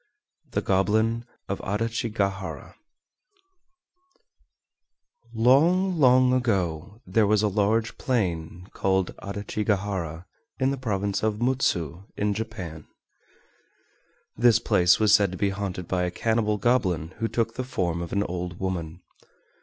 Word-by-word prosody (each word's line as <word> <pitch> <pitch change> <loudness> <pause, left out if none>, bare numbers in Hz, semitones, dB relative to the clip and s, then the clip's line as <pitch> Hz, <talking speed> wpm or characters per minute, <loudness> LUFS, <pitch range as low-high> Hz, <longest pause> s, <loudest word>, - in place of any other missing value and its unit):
THE - - -2
GOBLIN 110 +4 +1 0.2
OF - - -3
ADACHIGAHARA 105 -2 -2 2.6
Long, 165 +10 +3
long 130 -1 +5
ago 100 -6 -1
there 105 +3 +2
was 105 0 +3
a - - +3
large 105 +3 0
plain 90 -8 -2
called 95 -2 0
Adachigahara, 100 -4 -3 0.3
in 130 0 +2
the 140 - -2
province 100 -5 -1
of 110 -1 0
Mutsu 100 - 0
in 105 0 +1
Japan. 100 -8 -6 1.5
This 120 0 +5
place 95 -6 +3
was 110 -1 +4
said 100 -3 +4
to - - -5
be 100 -2 +1
haunted 95 -3 -4
by 90 -1 0
a - - -1
cannibal 110 +2 0
goblin 95 -8 +1
who 115 - 0
took 115 -1 -1
the 130 - -3
form 85 -9 -2
of 85 - -6
an 100 0 +1
old 90 -1 -5
woman. 90 -2 -4
100 Hz, 120 wpm, -25 LUFS, 90-115 Hz, 2.6 s, long